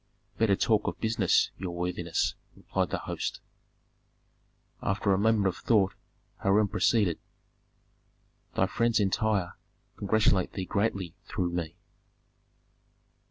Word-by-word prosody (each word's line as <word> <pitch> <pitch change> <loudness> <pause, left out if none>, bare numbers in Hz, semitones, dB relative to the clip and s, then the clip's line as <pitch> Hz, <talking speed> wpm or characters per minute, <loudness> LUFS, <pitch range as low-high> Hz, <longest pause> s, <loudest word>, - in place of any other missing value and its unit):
"Better 110 -3 +4
talk 110 +1 +2
of - - -3
business, 110 -4 +2
your 90 -2 -4
worthinesses," 85 -1 -1 0.2
replied - - -2
the - - -1
host. - - -4 1.4
After 100 0 +1
a - - +2
moment 110 -1 +3
of 95 -2 0
thought 100 -5 +2 0.4
Hiram 100 +1 +3
proceeded, 105 -4 +2 1.4
"Thy - - +3
friends 115 -1 +1
in 100 -2 +2
Tyre 105 -5 0 0.4
congratulate 100 -2 +2
thee 95 - -3
greatly 100 -4 -1
through 90 -1 -1
me." 85 -2 -3
100 Hz, 115 wpm, -29 LUFS, 90-110 Hz, 1.4 s, Better